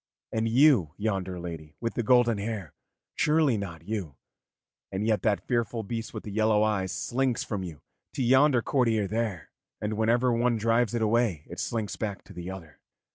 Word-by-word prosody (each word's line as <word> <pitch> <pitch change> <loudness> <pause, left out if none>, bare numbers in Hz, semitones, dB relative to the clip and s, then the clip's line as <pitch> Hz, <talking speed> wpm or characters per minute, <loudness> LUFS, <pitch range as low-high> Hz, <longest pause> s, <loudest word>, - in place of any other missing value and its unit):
And 110 0 0
you, 120 - +4
yonder 95 -4 -2
lady 80 -3 -7
with 115 - -2
the - - -1
golden 120 -2 +4
hair, 100 -7 -4 0.4
surely 150 -4 +3
not 85 -6 -5
you 100 -10 -4 0.8
and 100 +2 -2
yet 110 -4 +2
that 105 -2 0
fearful 115 -1 0
beast 115 +2 -4
with - - -7
the 105 - -7
yellow 110 0 +3
eyes 100 -3 0
slinks 130 -1 -1
from 100 -3 -3
you 85 -5 -8 0.3
to 130 - -1
yonder 130 0 +4
courtier 115 -6 +2
there, 105 -6 -3 0.3
and 105 +1 -2
whenever 120 +3 +2
one 120 0 +2
drives 115 +1 +2
it 115 - +1
away 110 -8 +1
it - - -8
slinks 110 -3 -2
back 105 -3 -4
to - - -14
the 90 +1 -6
other. 85 -6 -9
110 Hz, 180 wpm, -28 LUFS, 95-120 Hz, 0.8 s, you